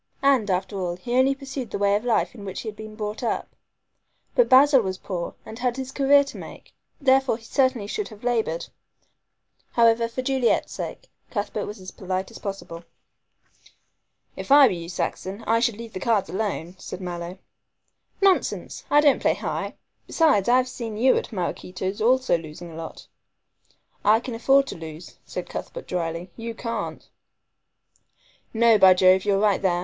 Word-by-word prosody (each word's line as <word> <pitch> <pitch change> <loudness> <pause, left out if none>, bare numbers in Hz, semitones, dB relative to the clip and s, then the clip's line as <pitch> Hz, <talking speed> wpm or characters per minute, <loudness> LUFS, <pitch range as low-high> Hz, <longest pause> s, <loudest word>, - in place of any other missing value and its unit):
And, 265 -7 +3
after 190 +2 -1
all, 175 -2 -2
he 240 +6 -5
only 265 +2 +4
pursued 270 -3 -6
the - - -3
way 200 0 +2
of 210 - -1
life 240 -2 +1
in 220 -5 -11
which 190 -2 -5
he - - -9
had 210 - -9
been 215 0 -9
brought 210 0 -4
up. 235 - -3 0.8
But - - +3
Basil 270 0 +7
was 190 -3 -3
poor 175 -3 -5
and 220 +2 -9
had 250 0 -1
his 265 0 -5
career 280 +1 +5
to 275 - -9
make, - - -11 0.3
therefore 265 -3 +3
he 230 - -19
certainly 260 -2 +1
should 415 - -3
have 215 -1 -14
labored. 225 -9 0 1.1
However, 230 0 +4
for 245 +3 -5
Juliet's 260 -2 +1
sake, - - -6 0.2
Cuthbert 205 -1 -3
was 210 0 -7
as 185 -1 -9
polite 185 0 -4
as - - -11
possible. 195 -4 -6 1.5
"If - - -7
I 285 0 +9
were 225 - +2
you, 170 -1 -6
Saxon, 190 +3 -4
I 230 +1 +3
should 235 -3 +1
leave 230 -1 -9
cards 205 +1 0
alone," 190 -3 -3
said - - -7
Mallow. 175 0 -6 0.9
"Nonsense! 385 -2 +1
I 295 - +6
don't 290 -3 +4
play - - +2
high. - - -4 0.3
Besides, 275 - +3
I 250 - +6
have 255 0 +2
seen 230 -4 -6
you 255 +4 +4
at - - -2
Maraquito's 185 0 -4
also 255 -5 +3
losing 165 +2 -10
a - - -10
lot." 160 0 -8 1.0
"I 215 +2 +5
can 245 +1 -6
afford 270 +4 +4
to - - -7
lose," 160 +1 -10
said - - -5
Cuthbert - - -7
dryly, 170 +1 -3
"you 230 0 -6
can't." 230 0 -5 1.4
"No, 230 -1 +4
by 190 -1 +8
Jove, 185 +1 +5
you're 200 -1 +3
right 205 -1 +2
there. 180 -3 +1
220 Hz, 175 wpm, -24 LUFS, 185-255 Hz, 1.5 s, I